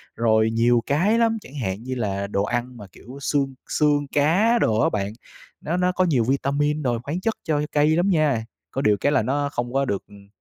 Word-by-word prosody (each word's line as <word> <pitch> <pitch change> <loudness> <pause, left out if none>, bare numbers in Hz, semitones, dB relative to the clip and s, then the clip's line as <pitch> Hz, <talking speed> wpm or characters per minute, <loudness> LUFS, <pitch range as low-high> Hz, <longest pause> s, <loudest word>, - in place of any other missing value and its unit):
rồi 110 -1 +2
nhiều 115 +1 +3
cái 185 +11 +2
lắm, 225 -1 +2
chẳng 140 - -14
hạn 95 0 -3
như 130 +1 -4
là 100 -4 -2
đồ 100 0 -1
ăn 120 +2 -3
mà, 105 - -10
kiểu, 130 +8 -12
xương 135 -1 0 0.2
xương 145 -2 +1
cá 190 +11 +3
đồ 110 - +2
á - - +3
bạn, 100 0 -3 0.5
nó 170 +3 -2
nó 180 0 +2
có 185 0 +1
nhiều 135 -9 +2
vitamin 140 +4 0
rồi 120 -3 0
khoáng 160 +7 -4
chất 225 - 0
cho 150 -2 0
cây 150 +1 +3
lắm 180 +4 +2
nha, 150 -10 +1 0.3
có 135 - -2
điều 105 -5 +3
cái 145 - +1
là - - +3
nó 140 +5 -1
không 120 +1 -4
có 135 0 +1
được, 100 -5 -2
ừm, 100 -1 -16
135 Hz, 225 wpm, -23 LUFS, 115-155 Hz, 0.5 s, nhiều